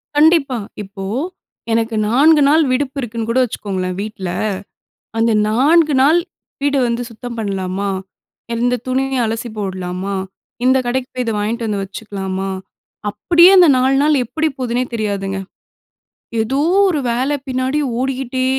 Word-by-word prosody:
கண்டிப்பா, 295 Hz, -4 st, +4 dB, 0.3 s
இப்போ 195 Hz, 0 st, -8 dB, 0.7 s
எனக்கு 225 Hz, 0 st, 0 dB
4 295 Hz, +7 st, +5 dB
நாள் 310 Hz, +3 st, +5 dB
விடுப்பு 270 Hz, +1 st, -1 dB
இருக்குன்னு 230 Hz, -2 st, -4 dB
கூட 240 Hz, +3 st, +2 dB
வச்சுக்கோங்களேன் 190 Hz, -6 st, -3 dB
வீட்ல. 205 Hz, -3 st, -5 dB, 0.9 s
அந்த 230 Hz, +1 st, +3 dB, 0.2 s
4 300 Hz, +7 st, +4 dB
நாள் 310 Hz, +5 st, +5 dB, 0.4 s
வீடு 285 Hz, -1 st, +2 dB
வந்து 235 Hz, +1 st, -1 dB
சுத்தம் 235 Hz, +1 st, -8 dB
பண்ணலாமா? 195 Hz, -2 st, -2 dB, 0.7 s
இந்த 245 Hz, +2 st, +1 dB
துணிய 265 Hz, +1 st, 0 dB
அலசி 225 Hz, +2 st, -3 dB
போடலாமா? 190 Hz, 0 st, -3 dB, 0.5 s
இந்த 260 Hz, +1 st, +4 dB
கடைக்கு 255 Hz, +1 st, -1 dB
போய் 250 Hz, -1 st, -2 dB
இத 230 Hz, -, -1 dB
வாங்கிட்டு 225 Hz, +3 st, -2 dB
வந்து 205 Hz, -2 st, -1 dB
வச்சுக்கலாமா? 195 Hz, -1 st, -5 dB, 0.6 s
அப்படியே 345 Hz, -, +5 dB
அந்த 355 Hz, -2 st, +7 dB
4 260 Hz, +1 st, +3 dB
நாள் 300 Hz, +1 st, +4 dB
எப்படி 315 Hz, +7 st, -1 dB
போகுதுன்னே 250 Hz, 0 st, -1 dB
தெரியாதுங்க. 200 Hz, -3 st, -2 dB, 1.0 s
ஏதோ 265 Hz, +5 st, -1 dB, 0.3 s
ஒரு 335 Hz, -5 st, 0 dB
வேல 250 Hz, +4 st, 0 dB, 0.2 s
பின்னாடி 260 Hz, +2 st, 0 dB, 0.2 s
ஓடிக்கிட்டே 260 Hz, -1 st, -2 dB
240 Hz, 130 wpm, -18 LUFS, 205-270 Hz, 1.0 s, அந்த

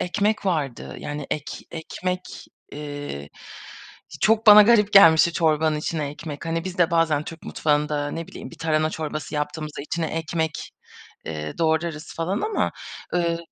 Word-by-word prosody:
ekmek 205 Hz, +3 st, 0 dB
vardı. 150 Hz, -9 st, -2 dB
Yani, 145 Hz, -1 st, -5 dB
ek 150 Hz, -1 st, -4 dB
ekmek, 180 Hz, +3 st, -5 dB, 0.3 s
eee, 145 Hz, -, -6 dB, 0.9 s
çok 225 Hz, +1 st, +3 dB
bana 210 Hz, 0 st, +11 dB
garip 210 Hz, -2 st, +4 dB
gelmişti 170 Hz, -4 st, +7 dB
çorbanın 160 Hz, -1 st, +2 dB
içine 150 Hz, -1 st, -2 dB
ekmek. 150 Hz, +1 st, -7 dB
Hani, 165 Hz, 0 st, -2 dB
biz 185 Hz, -1 st, -6 dB
de 175 Hz, -1 st, +4 dB
bazen 165 Hz, -3 st, +2 dB
Türk 165 Hz, +1 st, -9 dB
mutfağında, 150 Hz, -1 st, 0 dB
ne 165 Hz, +1 st, -5 dB
bileyim, -, -, -9 dB
bir -, -, -14 dB
tarhana 155 Hz, -1 st, +1 dB
çorbası 155 Hz, -1 st, -5 dB
yaptığımızda 150 Hz, 0 st, -4 dB
içine 165 Hz, +2 st, -2 dB
ekmek, 160 Hz, 0 st, -3 dB, 0.6 s
eee, 75 Hz, -1 st, -5 dB
doğrarız 160 Hz, -1 st, -1 dB
falan 180 Hz, +5 st, -2 dB
ama. 430 Hz, -1 st, 0 dB, 0.4 s
Iıı 170 Hz, -1 st, +1 dB
160 Hz, 140 wpm, -23 LUFS, 150-170 Hz, 0.9 s, bana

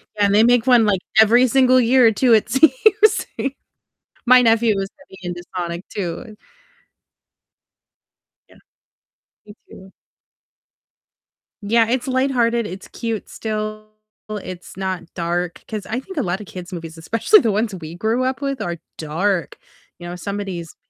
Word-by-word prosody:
Yeah, 205 Hz, -1 st, +2 dB
and 200 Hz, 0 st, +2 dB
they 215 Hz, -, +6 dB
make 245 Hz, +1 st, +3 dB
one 245 Hz, -3 st, +5 dB
like, 195 Hz, -3 st, +1 dB, 0.2 s
every 235 Hz, +4 st, +6 dB
single 255 Hz, +1 st, +4 dB
year 245 Hz, -1 st, +5 dB
too 235 Hz, +3 st, +3 dB
it 220 Hz, -, +3 dB
seems. 265 Hz, +3 st, +5 dB, 1.5 s
My 250 Hz, +1 st, +7 dB
nephew 225 Hz, -3 st, +3 dB
is 195 Hz, -, -3 dB
heavy 280 Hz, -9 st, -16 dB
into 175 Hz, -1 st, -6 dB
Sonic 170 Hz, 0 st, -4 dB
too. 200 Hz, +3 st, -6 dB, 2.1 s
Yeah, -, -, -20 dB, 0.9 s
me 205 Hz, -, -13 dB
too. 190 Hz, 0 st, -14 dB, 1.7 s
Yeah, 225 Hz, +2 st, +2 dB
it's 255 Hz, +2 st, -1 dB
light-hearted, 245 Hz, -3 st, +1 dB
it's 185 Hz, +3 st, -9 dB
cute 230 Hz, -3 st, -5 dB
still, 215 Hz, -1 st, -5 dB, 0.4 s
it's 185 Hz, -4 st, -8 dB
not 185 Hz, -3 st, -4 dB
dark, 175 Hz, 0 st, -3 dB
'cause 215 Hz, -2 st, -6 dB
I 235 Hz, +3 st, -2 dB
think 375 Hz, +7 st, -11 dB
a -, -, +2 dB
lotta 190 Hz, -1 st, -3 dB
kids 180 Hz, -2 st, -9 dB
movies, 165 Hz, -2 st, -8 dB
especially 230 Hz, -, +4 dB
the 225 Hz, -, +1 dB
ones 215 Hz, +1 st, -1 dB
we 165 Hz, -3 st, -8 dB
grew 220 Hz, +7 st, 0 dB
up 260 Hz, +2 st, -2 dB
with, 275 Hz, -1 st, -3 dB
are 170 Hz, -1 st, -3 dB, 0.2 s
dark, 165 Hz, +1 st, -2 dB, 0.4 s
you 175 Hz, -, -9 dB
know, 175 Hz, -, -6 dB
somebody's 190 Hz, -3 st, -6 dB
215 Hz, 145 wpm, -20 LUFS, 180-240 Hz, 2.1 s, My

